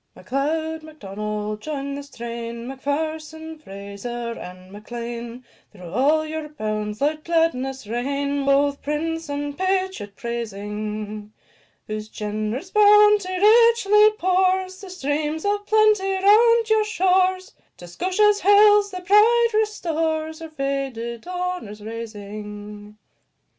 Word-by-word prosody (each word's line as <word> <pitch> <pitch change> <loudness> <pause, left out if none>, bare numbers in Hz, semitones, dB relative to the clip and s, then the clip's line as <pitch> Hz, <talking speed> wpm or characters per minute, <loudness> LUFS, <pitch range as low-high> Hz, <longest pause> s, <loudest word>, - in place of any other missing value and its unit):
M'Leod, 315 +4 -2
M'Donald, 210 -7 -5
join 280 -1 -4
the 285 - -5
strain, 235 -3 -7
M'Pherson, 310 +3 -4
Fraser, 215 +1 -6
and 185 -2 -11
M'Lean; 235 +3 -7 0.3
Through 180 -5 -11
all 300 +6 +2
your 310 -1 -5
bounds 215 -5 -4
let 305 +2 0
gladness 270 -6 0
reign, 280 +5 -2
Both 280 +1 +2
prince 325 +2 -3
and 285 0 -3
patriot 375 - -2
praising; 210 -2 -5 0.5
Whose 215 0 -5
generous 215 - -4
bounty 420 -2 +5
richly 430 -1 +6
pours 375 +1 +1
The 390 - -9
streams 305 -1 -2
of 410 0 -1
plenty 430 -3 +3
round 450 +4 +5
your 440 -1 +3
shores; 375 -2 +1 0.2
To 175 - -11
Scotia's 390 - +2
hills 410 +1 +6
their 365 -2 -7
pride 440 +5 +5
restores, 320 -7 -1
Her 325 -1 -8
faded 275 -4 -4
honours 360 - -4
raising. 210 -1 -8
295 Hz, 110 wpm, -23 LUFS, 230-370 Hz, 0.5 s, richly